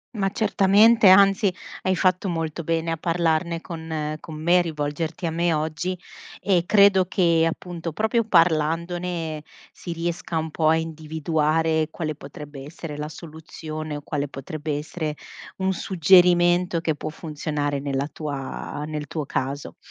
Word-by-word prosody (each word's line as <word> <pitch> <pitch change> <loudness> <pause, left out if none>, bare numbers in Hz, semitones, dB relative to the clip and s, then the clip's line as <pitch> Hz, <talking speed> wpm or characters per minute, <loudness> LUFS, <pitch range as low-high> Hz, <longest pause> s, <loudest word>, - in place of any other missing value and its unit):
Ma 195 -2 0
certamente, 210 +2 +4
anzi 195 +1 +6 0.3
hai 185 0 +1
fatto 185 +1 +1
molto 165 -1 -3
bene 165 +1 -1
a 165 - -1
parlarne 165 0 0
con 160 -3 -4
con 155 - -9
me, 175 +3 +4
rivolgerti 160 +1 -3
a 165 - 0
me 170 0 +1
oggi 160 +4 -2 0.4
e 180 -4 +2
credo 200 -2 +5
che, 170 -3 +3
appunto, 170 -1 -6
proprio 220 +5 +1
parlandone 165 -2 +1 0.3
si 175 - -8
riesca 170 0 -3
un 160 0 -2
po' 155 -1 +1
a 160 - +5
individuare 160 0 0
quale 160 -1 -4
potrebbe 145 0 -10
essere 150 +1 -8
la 150 +1 -5
soluzione 155 -1 -7
o 145 - -6
quale 145 -1 -2
potrebbe 145 +2 -5
essere 155 0 -4 0.4
un 190 0 0
suggerimento 175 -1 +4
che 165 -1 0
può 155 +1 -5
funzionare 150 -2 -3
nella 140 0 -2
tua 145 -1 -5
nel 150 -1 -5
tuo 150 +1 -4
caso. 140 +2 -4
165 Hz, 140 wpm, -24 LUFS, 155-175 Hz, 0.4 s, anzi